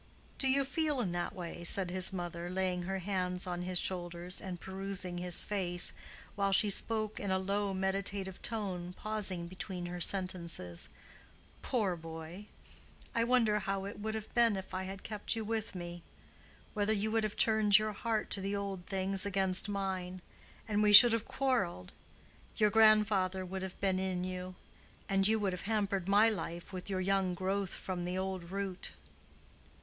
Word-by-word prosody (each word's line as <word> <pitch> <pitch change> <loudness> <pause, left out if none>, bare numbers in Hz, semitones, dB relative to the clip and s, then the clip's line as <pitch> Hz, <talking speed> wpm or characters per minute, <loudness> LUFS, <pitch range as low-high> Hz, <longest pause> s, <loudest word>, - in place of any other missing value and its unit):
"Do 270 - +2
you 275 +1 +3
feel 295 0 0
in 200 -7 -1
that 175 0 -3
way?" 175 -1 -7
said 180 +1 +1
his 185 0 0
mother, 175 -2 -5
laying 185 -1 -1
her 195 +2 -3
hands 180 -1 -2
on 175 -1 -3
his 180 0 -2
shoulders, 175 0 -2
and 180 -2 -6
perusing 190 -1 -4
his 180 -1 +2
face, 180 -4 +1 0.4
while 200 -1 0
she 205 +1 +4
spoke 215 +1 +4
in 200 - -3
a 190 - +2
low 200 +1 -1
meditative 190 0 -2
tone, 185 -6 -3
pausing 200 -5 -1
between 185 0 -6
her 175 0 -5
sentences. 170 - -1 0.7
"Poor 210 -8 0
boy!——I 165 +7 -8
wonder 230 -3 +3
how 195 -1 -2
it 200 +1 -7
would 220 +1 -3
have 220 0 -7
been 230 -4 +4
if 190 0 -8
I 185 0 -2
had 195 0 -7
kept 210 +1 -3
you 225 -1 -3
with 220 -2 -3
me——whether 175 +4 -6
you 215 +1 -1
would 225 0 +1
have 215 -1 -3
turned 215 -2 +5
your 215 0 -1
heart 220 0 -2
to 195 - -1
the 200 +1 -2
old 195 -3 -4
things 195 0 0
against 195 0 +3
mine——and 190 +2 -4
we 210 -1 +4
should 230 +3 +12
have 230 -1 -1
quarreled——your 210 - -2
grandfather 210 -4 +4
would 190 +1 -5
have 190 -1 -7
been 190 -2 +1
in 185 -1 -1
you——and 185 +1 -3
you 220 +1 +3
would 200 -3 -1
have 180 +3 -6
hampered 200 -4 0
my 205 +3 +6
life 175 -4 -4
with 185 +1 -6
your 190 -1 -1
young 190 -1 +1
growth 190 +1 -2
from 180 -2 -4
the 180 +1 -3
old 190 -2 -4
root." 195 -1 -4
190 Hz, 165 wpm, -33 LUFS, 180-210 Hz, 0.7 s, should